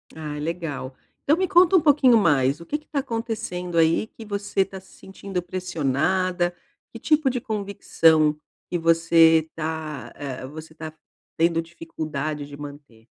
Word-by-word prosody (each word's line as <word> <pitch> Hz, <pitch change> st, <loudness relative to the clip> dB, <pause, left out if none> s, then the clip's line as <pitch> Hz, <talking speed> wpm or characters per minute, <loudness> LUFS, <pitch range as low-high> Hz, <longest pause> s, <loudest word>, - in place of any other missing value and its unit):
Ah, 150 Hz, -2 st, -6 dB
legal. 150 Hz, -5 st, -4 dB, 0.3 s
Então 295 Hz, -, +4 dB
me 375 Hz, +1 st, +1 dB
conta 360 Hz, 0 st, +5 dB
um 360 Hz, -, +6 dB
pouquinho 280 Hz, -5 st, +5 dB
mais, 145 Hz, -6 st, +2 dB
o -, -, -10 dB
que 300 Hz, -, -2 dB
que 305 Hz, -, -21 dB
tá 290 Hz, -, -2 dB
acontecendo 220 Hz, -8 st, -4 dB
aí 165 Hz, +6 st, +3 dB
que 225 Hz, -, -12 dB
você 200 Hz, -1 st, -1 dB
tá 190 Hz, 0 st, -9 dB
se 190 Hz, 0 st, -20 dB
sentindo 190 Hz, -1 st, -6 dB
pressionada? 175 Hz, +1 st, -1 dB, 0.4 s
Que 230 Hz, -, -8 dB
tipo 305 Hz, +1 st, +2 dB
de 250 Hz, -1 st, -3 dB
convicção 165 Hz, -8 st, +2 dB, 0.3 s
que 175 Hz, -, -1 dB
você 165 Hz, -1 st, +4 dB
tá, 155 Hz, -3 st, -5 dB
eh, 130 Hz, -2 st, -6 dB
você 155 Hz, +3 st, -10 dB
tá 160 Hz, -1 st, -8 dB, 0.4 s
tendo 165 Hz, 0 st, +2 dB
dificuldade 155 Hz, -3 st, -5 dB
de 145 Hz, 0 st, -10 dB
manter? 140 Hz, -6 st, -11 dB
165 Hz, 155 wpm, -24 LUFS, 155-200 Hz, 0.4 s, um